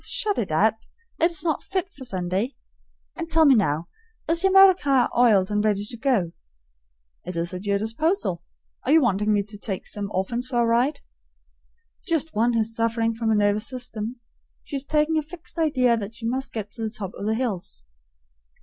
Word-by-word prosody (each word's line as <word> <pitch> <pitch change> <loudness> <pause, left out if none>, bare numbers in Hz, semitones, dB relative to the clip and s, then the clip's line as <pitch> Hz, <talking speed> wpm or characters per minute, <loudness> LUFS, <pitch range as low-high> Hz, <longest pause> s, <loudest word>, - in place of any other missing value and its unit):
'" - - -26
"Shut 415 -2 -1
it 195 - -2
up; 220 +8 +2 0.4
it's 335 -1 +2
not 320 -3 0
fit 380 0 -2
for 290 -8 -13
Sunday. 190 +3 -2 0.6
And 330 -1 -5
tell 320 0 +4
me 280 - +7
now, 170 - +1 0.4
is 335 +3 +3
yer 385 - +5
motor 385 0 +8
car 275 -7 +1
iled 215 -5 +4
and 210 0 +1
ready 205 -1 +1
to 235 - -2
go?" 230 -9 0 0.9
"It 180 +1 -6
is 170 +2 -2
at 185 +3 -6
your 200 0 +2
disposal. 220 - -1 0.4
Are 260 - 0
you 325 - +7
wanting 210 -3 +1
me 205 -1 +2
to 205 0 -12
take 195 -3 -4
some 205 -1 -4
orphans 235 +7 -2
for 250 -2 -1
a 235 - +3
ride?" 240 +6 +1 1.1
"Just 325 -2 0
one 235 +3 +2
who's 225 -1 0
sufferin' 230 0 0
from 225 0 -2
a 220 - +3
nervous 205 0 +2
system. 245 -2 -4 0.5
She's 275 -1 -5
taken 305 +2 +1
a - - +2
fixed 330 +2 -9
idea 255 -7 +3
that 215 0 -5
she 230 -1 -6
must 260 +3 -2
get 210 -2 -5
to 230 - -8
the 220 - -1
top 205 -4 -6
o' - - -7
the 215 +2 0
hills." 205 - -4
230 Hz, 195 wpm, -24 LUFS, 205-285 Hz, 1.1 s, motor